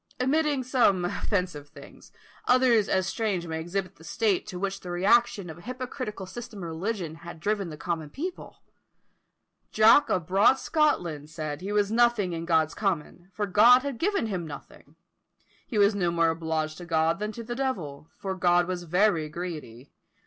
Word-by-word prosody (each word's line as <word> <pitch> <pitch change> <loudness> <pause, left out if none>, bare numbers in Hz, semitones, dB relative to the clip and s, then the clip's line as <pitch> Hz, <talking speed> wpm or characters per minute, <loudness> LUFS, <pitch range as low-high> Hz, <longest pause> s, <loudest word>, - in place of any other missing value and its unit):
Omitting 285 +1 +1
some 240 -8 +2
offensive 180 -6 -2
things, - - -15 0.4
others 250 -4 +4
as 190 -1 +1
strange 195 -2 -2
may 160 -1 -4
exhibit 185 +3 -4
the - - -16
state 205 +2 0
to 180 - -6
which 195 +1 -3
the 180 - -9
reaction 200 +2 +2
of 160 0 -9
an 170 - -14
hypocritical 255 -5 -5
system 220 0 -8
of 170 - -5
religion 175 0 -3
had 170 -1 -10
driven 200 0 -1
the 155 - -8
common 160 -1 -3
people. 350 - -7 1.1
"Jock 220 +7 +6
of 180 -3 0
broad 195 +9 +4
Scotland" 175 - 0
said 155 -1 -5
he 195 +2 -4
was 205 0 +1
nothing 230 -6 +2
in 165 0 -4
God's 160 -2 +2
common, 180 -2 -3
for 205 +2 -2
God 230 +6 +6
had 280 -4 -4
given 395 - +1
him 185 -6 -3
nothing; 145 - -12 0.7
he 230 - -3
was 205 +1 +5
no 185 -4 0
more 170 -1 +2
obliged 160 -1 -3
to 175 - -8
God 165 +1 +1
than 210 +1 -3
to 230 - -7
the 240 +2 -5
devil; 170 - -4
for 190 -1 -4
God 175 -1 +3
was 180 -1 -3
very 175 -2 +2
greedy. 150 -7 -7
190 Hz, 175 wpm, -27 LUFS, 165-225 Hz, 1.1 s, Jock